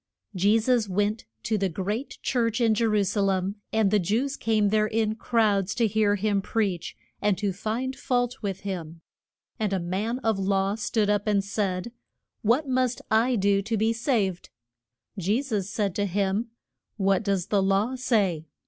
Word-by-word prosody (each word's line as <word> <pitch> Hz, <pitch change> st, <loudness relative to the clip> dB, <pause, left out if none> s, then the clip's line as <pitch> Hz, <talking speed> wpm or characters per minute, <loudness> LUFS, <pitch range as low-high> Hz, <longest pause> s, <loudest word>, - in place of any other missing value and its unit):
JE 200 Hz, +4 st, +4 dB
SUS 230 Hz, -2 st, +1 dB
went 205 Hz, +4 st, 0 dB, 0.2 s
to 215 Hz, -1 st, 0 dB
the 195 Hz, -1 st, +1 dB
great 205 Hz, -, -4 dB
church 230 Hz, -3 st, 0 dB
in 230 Hz, -2 st, +3 dB
Je 230 Hz, +2 st, +1 dB
ru 210 Hz, -2 st, +2 dB
sa 200 Hz, +2 st, 0 dB
lem, 195 Hz, +1 st, 0 dB
and 220 Hz, -3 st, +2 dB
the 210 Hz, -, +4 dB
Jews 230 Hz, +10 st, 0 dB
came 215 Hz, -4 st, +1 dB
there 215 Hz, +1 st, +2 dB
in 220 Hz, 0 st, 0 dB
crowds 215 Hz, -4 st, +1 dB
to 235 Hz, -, +2 dB
hear 210 Hz, -1 st, +2 dB
him 205 Hz, 0 st, 0 dB
preach, 195 Hz, -4 st, -2 dB, 0.2 s
and 205 Hz, -3 st, +2 dB
to 200 Hz, -2 st, -1 dB
find 230 Hz, +7 st, -3 dB
fault 245 Hz, -1 st, -1 dB
with 195 Hz, -3 st, -3 dB
him. 170 Hz, -4 st, -6 dB, 0.6 s
And 210 Hz, -3 st, 0 dB
a 190 Hz, -, +1 dB
man 195 Hz, +7 st, -2 dB
of 220 Hz, -3 st, +1 dB
law 195 Hz, 0 st, +1 dB
stood 215 Hz, -1 st, 0 dB
up 205 Hz, 0 st, 0 dB
and 200 Hz, -2 st, +2 dB
said, 195 Hz, +1 st, -2 dB, 0.5 s
What 245 Hz, +7 st, +2 dB
must 255 Hz, -1 st, 0 dB
I 235 Hz, +3 st, +3 dB
do 200 Hz, -1 st, +2 dB
to 220 Hz, +2 st, -2 dB
be 220 Hz, +2 st, +2 dB
saved? 225 Hz, -, -1 dB, 0.7 s
Je 205 Hz, +9 st, +1 dB
sus 210 Hz, -8 st, -2 dB
said 205 Hz, -3 st, -1 dB
to 205 Hz, 0 st, +1 dB
him, 200 Hz, +4 st, 0 dB, 0.5 s
What 195 Hz, -2 st, +2 dB
does 195 Hz, -4 st, -1 dB
the 200 Hz, -2 st, +3 dB
law 195 Hz, +5 st, +1 dB
say? 200 Hz, -11 st, 0 dB
210 Hz, 175 wpm, -26 LUFS, 195-225 Hz, 0.7 s, JE